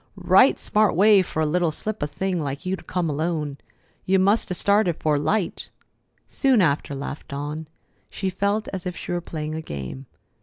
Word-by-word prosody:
Right -, -, +4 dB
smart 210 Hz, -3 st, +2 dB
way 200 Hz, +2 st, +6 dB
fer 160 Hz, -3 st, -3 dB
a -, -, +2 dB
little 170 Hz, +2 st, +1 dB
slip 210 Hz, +7 st, -4 dB
of 145 Hz, -, -1 dB
a -, -, -28 dB
thing 185 Hz, +2 st, -2 dB
like 140 Hz, +2 st, -5 dB
you 185 Hz, +1 st, 0 dB
to -, -, -12 dB
come 180 Hz, -2 st, -2 dB
alone. 150 Hz, -1 st, -2 dB, 0.4 s
You 190 Hz, +1 st, +2 dB
must 200 Hz, +4 st, +3 dB
'a' 180 Hz, -, -1 dB
started 200 Hz, -3 st, +3 dB
'fore 150 Hz, -2 st, +1 dB
light." 195 Hz, +5 st, -1 dB, 0.6 s
"Soon 265 Hz, -4 st, +2 dB
after," 145 Hz, -5 st, +1 dB
laughed 140 Hz, +1 st, -6 dB
Dawn. 150 Hz, +3 st, -5 dB, 0.4 s
She 190 Hz, -2 st, -3 dB
felt 200 Hz, +3 st, -1 dB
as 190 Hz, -1 st, -5 dB
if 180 Hz, -2 st, -5 dB
she -, -, -6 dB
were 175 Hz, 0 st, -1 dB
playing 155 Hz, -2 st, -5 dB
a 160 Hz, -, -4 dB
game. 100 Hz, -, -7 dB
175 Hz, 195 wpm, -23 LUFS, 150-195 Hz, 0.6 s, way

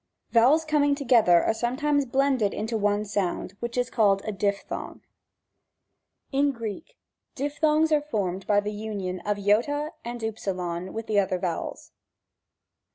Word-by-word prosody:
Vowels 265 Hz, +8 st, +5 dB
coming 290 Hz, -2 st, +2 dB
together 235 Hz, -, +4 dB
are -, -, +2 dB
sometimes 270 Hz, +5 st, 0 dB
blended 265 Hz, -4 st, +1 dB
into 220 Hz, +2 st, -3 dB
one 205 Hz, 0 st, +1 dB
sound, 195 Hz, -2 st, -2 dB
which 235 Hz, +1 st, -4 dB
is 250 Hz, 0 st, 0 dB
called 200 Hz, -4 st, +3 dB
a 215 Hz, -, -2 dB
diphthong. 200 Hz, 0 st, -3 dB, 1.3 s
4. 270 Hz, -, 0 dB
In 285 Hz, 0 st, +4 dB
Greek, 230 Hz, -, -7 dB, 0.4 s
diphthongs 300 Hz, +3 st, +1 dB
are 300 Hz, -1 st, +4 dB
formed 195 Hz, -10 st, -3 dB
by 205 Hz, -1 st, +4 dB
the 205 Hz, +1 st, -3 dB
union 205 Hz, -4 st, -4 dB
of 205 Hz, 0 st, +1 dB
I 245 Hz, +10 st, +1 dB
and 240 Hz, +1 st, -5 dB
V 220 Hz, 0 st, -1 dB, 0.6 s
with 225 Hz, +3 st, -5 dB
the 210 Hz, -2 st, +2 dB
other 190 Hz, -2 st, 0 dB
vowels. 175 Hz, -2 st, -4 dB
225 Hz, 145 wpm, -26 LUFS, 205-280 Hz, 1.3 s, Vowels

